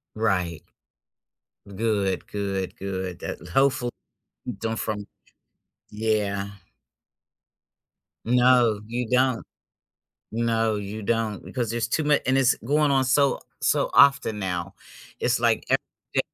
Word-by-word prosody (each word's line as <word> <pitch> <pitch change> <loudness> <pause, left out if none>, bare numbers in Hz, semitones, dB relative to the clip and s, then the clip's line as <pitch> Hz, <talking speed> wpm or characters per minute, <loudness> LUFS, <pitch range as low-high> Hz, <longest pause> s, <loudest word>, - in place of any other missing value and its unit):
Right. 90 -7 0 1.1
Good, 100 -2 -1
good, 95 -2 -3
good, 95 -2 -4
that - - -5
hopeful 125 +5 +2 0.7
done 115 0 -2
from 105 -2 -3 0.8
yeah. 105 -2 -1 1.8
No, 125 -2 +4
you 120 0 -3
don't. 125 -1 +2 0.9
No, 115 -2 +1
you 105 +1 -5
don't 110 -2 -1
because 120 -4 -3
there's 115 -1 -1
too 155 +5 0
mu 150 -1 +4
and 130 +1 +3
it's 130 -1 +4
going 145 +3 +2
on 135 -1 +3
so 140 +2 +3 0.2
so - - +1
often 140 -7 +5
now, 90 0 -3 0.5
it's, - - +2
like, - - +2
every - - +5 0.4
day - - +4
110 Hz, 115 wpm, -25 LUFS, 100-125 Hz, 1.8 s, often